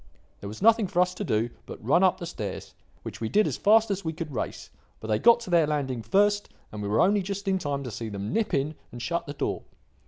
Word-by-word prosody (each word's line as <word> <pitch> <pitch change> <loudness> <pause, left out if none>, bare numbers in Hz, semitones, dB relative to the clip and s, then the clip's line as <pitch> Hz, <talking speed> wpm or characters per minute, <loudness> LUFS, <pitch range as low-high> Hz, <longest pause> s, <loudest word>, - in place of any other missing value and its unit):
There 100 - -7
was 110 - -7
nothing 225 -2 +5
for 175 - -1
us 180 0 +3
to 195 - -5
do 115 - 0 0.2
but - - -9
run 160 +7 +4
up 185 - +4
the 170 - -5
stairs, 105 - -6 0.3
which - - -8
we 110 - -2
did 215 0 +3
as - - -1
fast 220 +1 +4
as 195 0 -2
we 160 -1 -2
could 160 -2 -6
race; - - -5 0.3
but 110 - -8
they 105 - +2
got 235 0 +6
to 220 - -7
their 165 -3 +4
landing 135 -5 -2
first, 205 - +2 0.2
and 105 - -6
we 100 - -3
were 105 +3 +2
only 200 +2 +4
just 200 +1 -5
in 190 -1 +2
time 145 -4 -3
to 125 - -6
see 110 +2 -5
them 100 +2 -5
nip 225 -1 0
in 140 +3 0 0.2
and 120 - -8
shut 170 +8 -2
the 145 - -5
door. - - -2
165 Hz, 260 wpm, -27 LUFS, -, 0.3 s, got